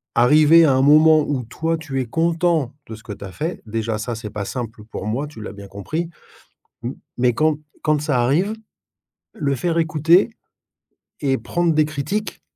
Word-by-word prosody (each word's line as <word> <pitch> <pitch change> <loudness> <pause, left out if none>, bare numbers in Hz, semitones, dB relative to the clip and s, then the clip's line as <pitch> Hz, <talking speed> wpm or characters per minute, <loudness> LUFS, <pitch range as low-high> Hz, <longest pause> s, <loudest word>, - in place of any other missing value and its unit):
arrivé 155 +6 +6
à 140 - +4
un 130 - +3
moment 155 +3 +6
où 145 -3 -2
toi 160 +8 -2
tu 145 -4 -4
es - - -3
content 165 0 +1
de 110 - -7
ce 110 - -15
que 105 - -7
tu 100 - -11
as 95 - -7
fait. 160 - -4
Déjà 110 0 -2
ça, 115 +3 -4
c'est 110 -1 -7
pas 105 - -4
simple 115 -2 -6
pour 105 - -7
moi, 120 +7 -1
tu 145 -6 -12
l'as 105 - -7
bien 100 -1 -10
compris. 155 - -4 0.7
M 125 +2 -4 0.2
mais 125 0 +3
quand 155 +4 +1 0.2
quand 155 -1 +2
ça 145 -4 +1
arrive, 170 - +1 0.8
le 140 -3 -1
faire 170 +5 -1
écouter 165 +5 +3 0.9
et 135 -2 +1
prendre 170 +8 0
des 155 0 +3
critiques, 155 +8 -4
145 Hz, 185 wpm, -21 LUFS, 115-160 Hz, 0.9 s, arrivé